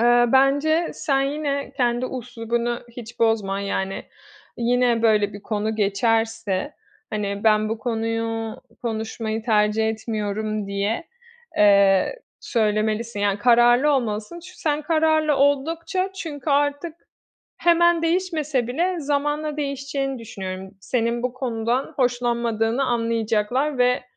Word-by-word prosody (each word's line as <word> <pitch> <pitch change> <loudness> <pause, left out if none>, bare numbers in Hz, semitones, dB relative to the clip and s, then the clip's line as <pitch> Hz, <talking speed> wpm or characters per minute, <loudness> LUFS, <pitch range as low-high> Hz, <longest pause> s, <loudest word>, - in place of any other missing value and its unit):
Eee, 240 +1 +5
bence 285 +5 +3
sen 275 -3 0
yine 280 0 -2
kendi 240 -1 +1 0.2
üslubunu 235 0 -2 0.2
hiç 240 0 -10
bozma. 210 -3 +1
Yani, 195 -1 -3 0.5
yine 240 -1 +2
böyle 210 -3 +3
bir 205 - -10
konu 215 0 -2
geçerse, 215 -1 0 0.4
hani 200 -2 -2
"Ben 215 0 +4
bu 225 +1 -3
konuyu 225 -1 -2 0.3
konuşmayı 220 -1 -3
tercih 215 -1 +2
etmiyorum." 215 -1 -3
diye, 200 +9 -2 0.5
eee, 200 - +4 0.2
söylemelisin, 215 0 0
yani 205 0 +1
kararlı 240 +5 +5
olmalısın. 230 +4 -2
Çü 365 +2 -12
sen 300 -1 -1
kararlı 315 -2 +2
oldukça, 330 +7 +1
çünkü 315 -6 -5
artık 290 +3 +1 0.6
hemen 345 0 +4
değişmese 325 -7 0
bile 345 +7 0
zamanla 295 +1 -1
değişeceğini 275 -2 -3
düşünüyorum. 190 -4 -7
Senin 235 +2 -1
bu 250 -1 -1
konudan 245 0 -2
hoşlanmadığını 240 -1 0
anlayacaklar 230 +4 0
ve 250 0 +3
235 Hz, 110 wpm, -23 LUFS, 220-280 Hz, 0.6 s, Eee